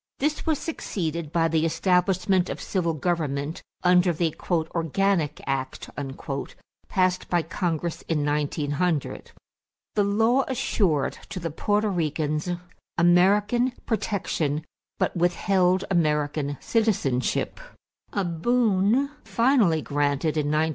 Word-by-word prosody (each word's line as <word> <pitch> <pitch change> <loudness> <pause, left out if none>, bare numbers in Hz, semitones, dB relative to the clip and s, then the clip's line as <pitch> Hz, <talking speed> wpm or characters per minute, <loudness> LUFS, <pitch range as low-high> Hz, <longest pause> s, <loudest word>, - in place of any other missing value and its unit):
This 300 +4 -1
was 315 -2 +2
succeeded 170 - -4
by 165 -1 +2
the 160 -1 +1
establishment 185 +2 +2
of - - -4
civil 170 -4 -1
government 155 -2 -2 0.2
under 180 0 +5
the 165 -1 -1
"organic 165 0 0
act" 135 -1 -3 1.0
passed 185 -1 +1
by 175 -2 +2
Congress 170 -1 -2
in 150 -3 0
1900. 150 +2 -1 0.6
The 205 - +2
law 225 +6 +3
assured 190 - 0
to - - -5
the 170 -2 -4
Porto 210 +6 +1
Ricans 155 -2 -1 0.5
American 205 +8 +4
protection 165 -9 -1 0.3
but - - 0
withheld 180 +1 +2
American 150 -4 +1
citizenship 200 - 0 0.5
a 200 -2 -1
boon 225 - +2
finally 230 - +3
granted 145 +1 0
in 150 -2 0
1917. 155 +1 +2
175 Hz, 105 wpm, -25 LUFS, 155-200 Hz, 1.0 s, under